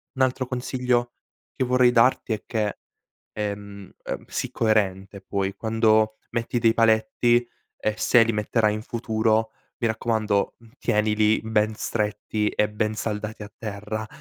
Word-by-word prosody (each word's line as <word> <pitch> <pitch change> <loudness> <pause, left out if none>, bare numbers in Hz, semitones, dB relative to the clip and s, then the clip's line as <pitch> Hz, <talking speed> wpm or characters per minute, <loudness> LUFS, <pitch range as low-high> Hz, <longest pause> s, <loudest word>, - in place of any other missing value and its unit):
Un 130 - -2
altro 130 0 0
consiglio 125 -1 -1 0.4
che 130 - -1
vorrei 125 0 +4
darti 120 -1 +3
è 105 - -5
che, 105 -3 -2 0.6
ehm 100 -1 -5
ehm, - - -5
sii - - -3
coerente 100 -3 0
poi 100 -1 -2
quando 110 0 +2
metti 120 +1 -1
dei 115 0 +4
paletti, 115 +2 +3 0.3
e 110 - 0
se 120 -2 +5
li 115 - +1
metterai 105 0 +1
in 110 - -5
futuro, 110 -1 0 0.3
mi 115 - +1
raccomando, 110 -2 0
mhmm, 115 -1 -19
tienili 105 0 +2
ben 110 -1 +1
stretti 105 -1 -1
e 105 0 0
ben 105 +1 -1
saldati 110 0 -4
a 105 - -8
terra. 110 0 -5
110 Hz, 145 wpm, -24 LUFS, 105-115 Hz, 0.6 s, se